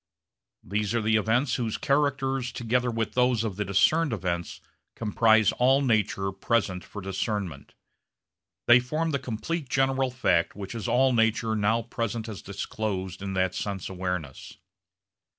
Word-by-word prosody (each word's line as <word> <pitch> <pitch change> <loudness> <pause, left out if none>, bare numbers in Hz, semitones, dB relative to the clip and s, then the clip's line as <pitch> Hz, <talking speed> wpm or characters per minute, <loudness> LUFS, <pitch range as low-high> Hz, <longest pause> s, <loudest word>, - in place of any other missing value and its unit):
These 105 +3 -1
are 120 - +2
the 110 +1 +2
events 115 +5 +1
whose 115 -4 -2
characters 135 -3 0
together 125 +1 0
with 115 -2 -2
those 125 -2 +2
of 110 -4 -3
the 105 - -1
discerned 120 - +2
events 85 -5 -3 0.4
comprise 110 -1 +3
all 135 +3 +4
nature 105 -5 +1
present 95 -2 -1
for 105 - -9
discernment. 95 - -4 0.9
They 120 +1 +7
form 155 +6 -2
the 140 - 0
complete 135 +5 -4
general 135 0 +1
fact 120 -10 +1
which 100 0 -7
is 115 0 -4
all 130 +2 +3
nature 115 -1 +2
now 110 +2 +1
present 115 -1 -3
as 110 -4 -7
disclosed 95 -2 -4
in 100 -1 -4
that 95 -1 +1
sense 100 -3 -4
awareness. 90 -7 -5
110 Hz, 145 wpm, -27 LUFS, 100-125 Hz, 0.9 s, They